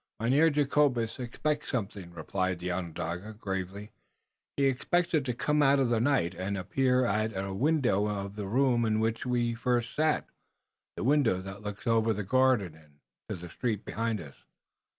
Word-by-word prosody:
"Mynheer 135 +8 +4
Jacobus 140 -6 +1
expects 145 +5 -2
something," 100 -7 -3
replied 95 +2 -2
the 90 +1 -3
Onondaga, 90 +3 -4
gravely. 100 0 -5 0.7
"He 140 - +3
expects 165 +7 +1
it 155 -4 +3
to 125 - -1
come 150 +4 +1
out 140 0 +5
of 135 -3 +2
the 115 -2 +2
night, 115 -9 +2
and 95 +3 -3
appear 125 +7 +2
at 110 -1 0
a 95 0 -3
window 125 -5 +2
of 100 -1 -4
the 105 -2 -4
room 125 +2 +2
in 110 -1 +1
which 115 +2 -1
we 120 -1 +1
first 120 0 0
sat, 155 0 +1 0.7
the - - -3
window 130 -7 +3
that 95 +1 -8
looks 105 +1 -7
over 115 -1 +3
the 105 0 -3
garden, 125 -5 +2
and 75 -2 -21 0.3
to - - -2
the 90 -1 -9
street 110 -5 -2
behind 115 -1 -2
us." 75 -5 -11
115 Hz, 170 wpm, -29 LUFS, 95-130 Hz, 0.7 s, out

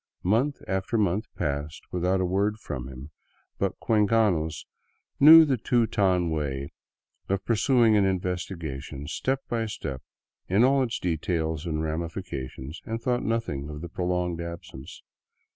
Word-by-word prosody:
Month 120 +10 +1
after 95 +4 -1
month 105 +1 +1
passed 75 +2 -3
with 90 -1 -2
out 95 +1 +2
a - - +1
word 100 +4 0
from 65 - -6
him, 65 +3 -10 0.5
but - - -1
cuencanos 105 -8 +2 0.5
knew 160 +3 +10
the 135 -4 +1
Teuton 100 -7 +2
way 70 -3 -3 0.6
of 95 0 -1
pur 115 - +2
suing 115 -1 +4
an 105 - +4
investigation 85 -7 -3
step 135 - -1
by 115 -1 -1
step 70 -10 -5 0.5
in 100 +6 +3
all 135 +2 +4
its 115 -3 -1
details 80 -1 -2
and 80 -1 -1
ramifications, 75 -3 -5
and 115 +1 -4
thought 125 0 0
nothing 110 -12 -2
of 75 0 -7
the 85 - -6
prolonged 90 -1 -1
absence. 85 -6 -9
90 Hz, 145 wpm, -26 LUFS, 80-110 Hz, 0.6 s, knew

